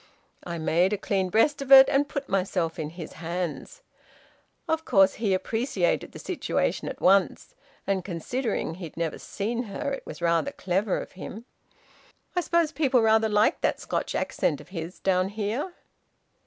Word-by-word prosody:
I 170 Hz, -1 st, -4 dB
made 170 Hz, +4 st, +2 dB
a -, -, 0 dB
clean 190 Hz, -2 st, -1 dB
breast 280 Hz, +9 st, +2 dB
of 275 Hz, -1 st, -5 dB
it, 270 Hz, 0 st, +11 dB
and 285 Hz, +1 st, +1 dB
put 280 Hz, -1 st, -4 dB
myself 180 Hz, -4 st, -1 dB
in 150 Hz, -1 st, -3 dB
his 165 Hz, 0 st, -9 dB
hands. 175 Hz, -, -4 dB, 0.8 s
Of 320 Hz, 0 st, 0 dB
course 195 Hz, -8 st, +4 dB
he 210 Hz, -4 st, +1 dB
appreciated 200 Hz, -1 st, -1 dB
the -, -, -10 dB
situation -, -, -2 dB
at -, -, -7 dB
once; 195 Hz, -, +2 dB, 0.3 s
and 195 Hz, -2 st, 0 dB
considering 200 Hz, +2 st, -3 dB
he'd 170 Hz, -3 st, -9 dB
never 165 Hz, -2 st, -2 dB
seen 235 Hz, +4 st, -3 dB
her, 280 Hz, +8 st, -4 dB
it 275 Hz, -, -4 dB
was -, -, -9 dB
rather 170 Hz, +11 st, +1 dB
clever 190 Hz, +2 st, 0 dB
of -, -, -8 dB
him... 215 Hz, +4 st, -9 dB, 0.9 s
I 355 Hz, -, +2 dB
suppose 335 Hz, -2 st, +1 dB
people 270 Hz, -7 st, +2 dB
rather 220 Hz, 0 st, +4 dB
like 210 Hz, +8 st, +2 dB
that -, -, +1 dB
Scotch -, -, -3 dB
accent 145 Hz, -, 0 dB
of -, -, -14 dB
his, 170 Hz, -1 st, -6 dB
down 185 Hz, 0 st, +1 dB
here?" 220 Hz, -, -3 dB
200 Hz, 165 wpm, -26 LUFS, 175-255 Hz, 0.9 s, it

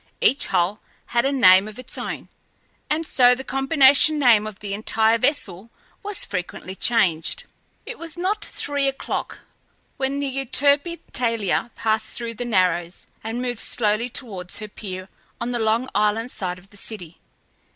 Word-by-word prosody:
Each 275 Hz, -, +3 dB
hull 180 Hz, +5 st, +1 dB, 0.3 s
had 235 Hz, +1 st, +3 dB
a 275 Hz, -, +2 dB
name 190 Hz, -7 st, +6 dB
of 215 Hz, -, -10 dB
its 255 Hz, -, -5 dB
own, -, -, -4 dB, 0.6 s
and 315 Hz, +2 st, 0 dB
so 250 Hz, -4 st, +5 dB
the 265 Hz, -, -7 dB
combination 270 Hz, +3 st, +4 dB
name 230 Hz, -7 st, +5 dB
of 215 Hz, -2 st, -8 dB
the 200 Hz, -1 st, -6 dB
entire 220 Hz, +2 st, +2 dB
vessel 225 Hz, -, -1 dB, 0.3 s
was 410 Hz, -2 st, +1 dB
frequently 180 Hz, 0 st, -5 dB
changed. 195 Hz, -, +1 dB, 0.4 s
It -, -, -8 dB
was 335 Hz, 0 st, -7 dB
not 385 Hz, +4 st, -1 dB
three 285 Hz, -1 st, -1 dB
o'clock 270 Hz, 0 st, -4 dB, 0.6 s
when 275 Hz, +1 st, -1 dB
the 285 Hz, -, -1 dB
Euterpe 280 Hz, +5 st, +1 dB
Thalia 230 Hz, -2 st, 0 dB
passed 220 Hz, 0 st, -1 dB
through 235 Hz, -1 st, -4 dB
the 245 Hz, +2 st, -5 dB
Narrows 180 Hz, -5 st, 0 dB, 0.2 s
and 225 Hz, +3 st, -3 dB
moved 245 Hz, -2 st, -3 dB
slowly 215 Hz, +1 st, 0 dB
towards 195 Hz, -8 st, -4 dB
her 215 Hz, -, -6 dB
pier 185 Hz, -3 st, -8 dB, 0.3 s
on 235 Hz, +1 st, -2 dB
the 240 Hz, -, -1 dB
Long 225 Hz, +3 st, +1 dB
Island 215 Hz, +4 st, +1 dB
side 180 Hz, -2 st, -4 dB
of 190 Hz, +2 st, -18 dB
the 205 Hz, -, -14 dB
city. 180 Hz, -6 st, -8 dB
230 Hz, 160 wpm, -23 LUFS, 205-270 Hz, 0.6 s, name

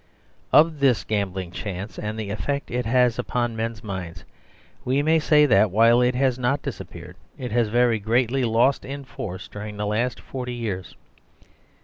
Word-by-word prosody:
Of 155 Hz, -1 st, +5 dB
this 135 Hz, -4 st, +3 dB
gambling 95 Hz, -4 st, -2 dB
chance 100 Hz, +2 st, -6 dB
and 105 Hz, +1 st, -4 dB
the 105 Hz, -2 st, -4 dB
effect 140 Hz, +7 st, -3 dB
it 125 Hz, 0 st, -2 dB
has 125 Hz, 0 st, +3 dB
upon 120 Hz, -1 st, -1 dB
men's 115 Hz, -2 st, -4 dB
minds 90 Hz, -5 st, -6 dB, 0.6 s
we 135 Hz, +3 st, +1 dB
may 160 Hz, +1 st, +3 dB
say 150 Hz, -1 st, +5 dB
that, 105 Hz, -5 st, +4 dB
while 115 Hz, +5 st, +5 dB
it 125 Hz, 0 st, +2 dB
has 130 Hz, -1 st, +1 dB
not 130 Hz, +3 st, 0 dB
dis 140 Hz, -, -5 dB
appeared, 90 Hz, 0 st, -10 dB, 0.2 s
it 125 Hz, -4 st, -5 dB
has 120 Hz, 0 st, +2 dB
very 120 Hz, 0 st, +2 dB
greatly 120 Hz, +5 st, +1 dB
lost 120 Hz, +4 st, +2 dB
in 140 Hz, 0 st, -7 dB
force 105 Hz, -9 st, -7 dB
during 105 Hz, 0 st, -8 dB
the 105 Hz, -, -2 dB
last 110 Hz, +3 st, -1 dB
forty 125 Hz, -2 st, -6 dB
years. 100 Hz, -7 st, -5 dB
115 Hz, 170 wpm, -24 LUFS, 105-130 Hz, 0.6 s, Of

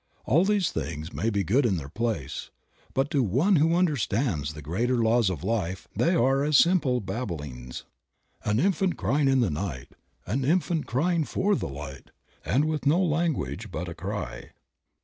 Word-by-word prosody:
All 165 Hz, +8 st, +4 dB
these 205 Hz, -3 st, +2 dB
things 80 Hz, 0 st, -4 dB
may 110 Hz, -, 0 dB
be 100 Hz, -3 st, 0 dB
good 115 Hz, -, +2 dB
in 105 Hz, -7 st, +2 dB
their 70 Hz, -4 st, -6 dB
place, 105 Hz, -, -3 dB, 0.5 s
but 135 Hz, +2 st, +1 dB
to 140 Hz, -, +2 dB
one 135 Hz, -, +3 dB
who 160 Hz, +3 st, +3 dB
understands 120 Hz, -, 0 dB
the 75 Hz, -, -8 dB
greater 115 Hz, -, 0 dB
laws 115 Hz, -2 st, +3 dB
of 85 Hz, -7 st, -4 dB
life 95 Hz, -5 st, -2 dB
they 175 Hz, +2 st, +2 dB
are 135 Hz, 0 st, +3 dB
as 150 Hz, -1 st, +4 dB
simple 160 Hz, -8 st, +3 dB
babblings^ 75 Hz, -, -5 dB, 0.6 s
"An 105 Hz, +1 st, +1 dB
infant 190 Hz, +1 st, +1 dB
crying 145 Hz, 0 st, +1 dB
in 135 Hz, -1 st, +4 dB
the 105 Hz, -8 st, +1 dB
night, 75 Hz, -5 st, -4 dB, 0.4 s
An 125 Hz, +9 st, -1 dB
infant 165 Hz, +2 st, +1 dB
crying 165 Hz, +6 st, +1 dB
for 200 Hz, +7 st, 0 dB
the -, -, -3 dB
light. 70 Hz, 0 st, -8 dB, 0.3 s
And 145 Hz, +4 st, +2 dB
with 155 Hz, -2 st, -1 dB
no 160 Hz, +5 st, +4 dB
language 155 Hz, -, -1 dB
but -, -, -4 dB
a -, -, -5 dB
cry." -, -, -6 dB
125 Hz, 170 wpm, -27 LUFS, -, 0.6 s, All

